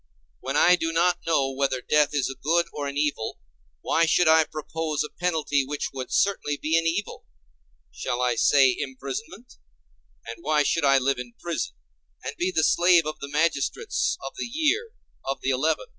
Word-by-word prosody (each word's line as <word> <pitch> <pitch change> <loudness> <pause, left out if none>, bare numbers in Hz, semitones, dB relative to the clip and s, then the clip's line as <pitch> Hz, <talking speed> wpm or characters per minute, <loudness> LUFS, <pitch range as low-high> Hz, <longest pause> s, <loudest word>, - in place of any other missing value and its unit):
When - - -2
I 180 - +6
do 165 -2 -2
not 175 +2 +2
know 140 -5 +2
whether 135 -1 -1
death 150 +3 +2
is 145 -3 0
a - - -4
good 170 +3 +2
or 145 -1 -4
an 140 0 -5
evil, 145 -7 -1 0.4
why 165 0 +2
should 170 +2 +3
I 160 0 +6
propose 155 0 -3
a 150 - -8
penalty 160 -5 +1
which 145 +2 -4
would 130 -1 -6
certainly 185 -7 +1
be 155 +3 -1
an 165 0 +2
evil? 185 +6 -3 0.6
Shall 120 +11 -3
I 125 -1 +2
say 130 +2 +4
imprisonment? 140 - -7 0.7
And 115 0 -7
why 150 0 +2
should 160 +1 +1
I 135 0 +5
live 135 0 0
in 120 -1 -8
prison, 170 - -3 0.5
and - - -5
be 180 - -1
the 160 -3 +1
slave 175 0 +4
of 155 - -5
the 140 - -7
magistrates 160 - 0
of - - -6
the - - -3
year—of 320 - -2
the 135 - 0
Eleven? 155 - 0
150 Hz, 180 wpm, -25 LUFS, 135-170 Hz, 0.7 s, I